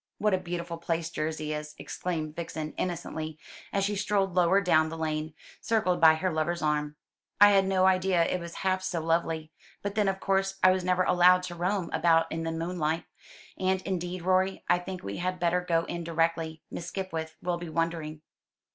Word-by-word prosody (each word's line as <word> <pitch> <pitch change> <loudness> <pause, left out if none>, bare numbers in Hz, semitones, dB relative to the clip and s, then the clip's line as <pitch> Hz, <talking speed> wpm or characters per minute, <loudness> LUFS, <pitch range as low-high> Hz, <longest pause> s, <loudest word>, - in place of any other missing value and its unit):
"What 210 -1 +1
a 185 - +2
beautiful 170 -2 -5
place 165 0 -2
Jersey 155 -1 -3
is!" 150 0 -6
exclaimed 160 -4 -4
Vixen 160 -2 -5
innocently, 160 -3 -4 0.3
as 200 - 0
she 205 +1 0
strolled 200 -2 0
lower 180 +2 +4
down 160 -5 +3
the 165 - -6
lane, 155 -1 -3 0.3
circled 185 -6 +1
by 160 -1 +8
her 185 +2 -1
lover's 160 +2 -1
arm. 150 -1 0 0.4
"I 205 0 +9
had 195 -1 +4
no 190 -1 +3
idea 185 -2 +3
it 180 - -1
was 170 0 -8
half 185 0 +2
so 180 -2 -2
lovely. 165 -1 -1 0.3
But 200 0 -2
then 210 -1 +1
of 195 0 0
course 195 0 0
I 185 - +8
was 185 0 0
never 180 0 +2
allowed 180 0 +5
to 175 -1 -5
roam 180 +1 -1
about 165 -1 +3
in 165 - -2
the 165 0 -2
moonlight. 165 -1 -2 0.5
And, 190 0 +1
indeed, 180 -1 -3
Rorie, 185 +1 +1
I 175 - +4
think 185 +1 -7
we 100 0 -5
had 180 +1 -2
better 175 +1 +2
go 170 -2 +1
in 170 0 -4
directly. 165 -1 -1
Miss 170 - -6
Skipwith 165 -4 -4
will 175 -1 -2
be 175 -1 -6
wondering." 160 -1 -2
175 Hz, 190 wpm, -28 LUFS, 160-185 Hz, 0.5 s, I